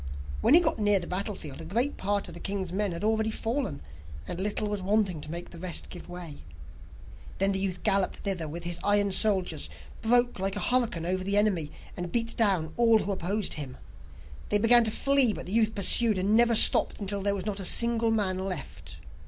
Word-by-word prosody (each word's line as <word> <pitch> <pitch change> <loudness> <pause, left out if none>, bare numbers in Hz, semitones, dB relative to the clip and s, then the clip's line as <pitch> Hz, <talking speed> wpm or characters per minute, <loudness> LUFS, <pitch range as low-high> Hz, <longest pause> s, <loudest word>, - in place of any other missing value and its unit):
When 285 - +5
he - - +9
got 325 -6 0
near 205 -1 +3
the 175 - -5
battlefield 185 -6 -5
a - - -8
great 245 +8 -1
part 200 +1 -2
of - - -10
the - - -10
king's 195 -3 -4
men 205 0 0
had 170 +2 -6
already 220 0 +1
fallen, 225 - -3 0.4
and 175 - -4
little 210 +1 -1
was 205 -1 -3
wanting 195 -4 0
to 150 - -7
make 170 +2 -7
the 170 - -11
rest 180 -1 -2
give 175 - -10
way. 175 -4 -9 0.9
Then 195 +1 +2
the 190 - 0
youth 190 -2 -3
galloped 200 -3 +1
thither 185 -5 -2
with 170 +3 -7
his 175 0 -1
iron 205 0 +2
soldiers, 185 -6 0 0.3
broke 245 0 +1
like 195 +1 -2
a - - -3
hurricane 235 -10 -1
over 185 +1 -2
the 200 +2 0
enemy, 190 -8 +1 0.3
and 175 -1 -6
beat 230 -1 -1
down 190 -8 +1
all 230 -1 +4
who 205 - -3
opposed 195 +2 -2
him. 140 -4 -7 0.7
They 210 - +3
began 235 +3 +6
to - - +1
flee, 275 0 +4
but - - -7
the 185 - -6
youth 220 -1 +1
pursued, 215 +2 +4
and 195 +3 +1
never 235 0 +4
stopped, - - +4
until 200 -1 -4
there 200 +1 +1
was 190 -1 -5
not 205 -2 -3
a - - -4
single 235 +3 +3
man 200 -4 0
left. 85 - -6
200 Hz, 210 wpm, -27 LUFS, 180-220 Hz, 0.9 s, he